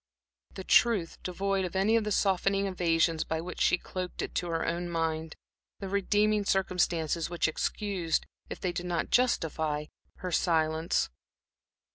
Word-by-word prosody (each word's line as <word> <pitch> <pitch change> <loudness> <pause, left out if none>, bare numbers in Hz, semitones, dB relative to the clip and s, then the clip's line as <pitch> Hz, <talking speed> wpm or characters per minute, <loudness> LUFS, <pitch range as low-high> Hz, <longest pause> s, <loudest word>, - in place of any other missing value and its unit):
The 190 - -6
truth, 205 -5 +3
devoid 195 +1 -1
of 180 0 -4
any 200 +4 +3
of 225 -2 +2
the 210 - -2
softening 195 0 +2
evasions 165 -3 +1
by 160 - -2
which 180 +2 -6
she - - +4
cloaked 180 0 -5
it - - -5
to 175 - -1
her 165 -1 -1
own 175 +1 -2
mind; 160 -1 -2 0.4
the 195 - -5
redeeming 205 +2 +2
circumstances 175 -4 0
which 175 -1 +1
excused, 180 +1 -1 0.2
if - - -6
they 180 - -1
did 175 +1 -4
not 175 -1 -2
justify, 160 -11 +1 0.3
her 185 - -5
silence. 160 - +1
180 Hz, 150 wpm, -29 LUFS, 165-195 Hz, 0.4 s, she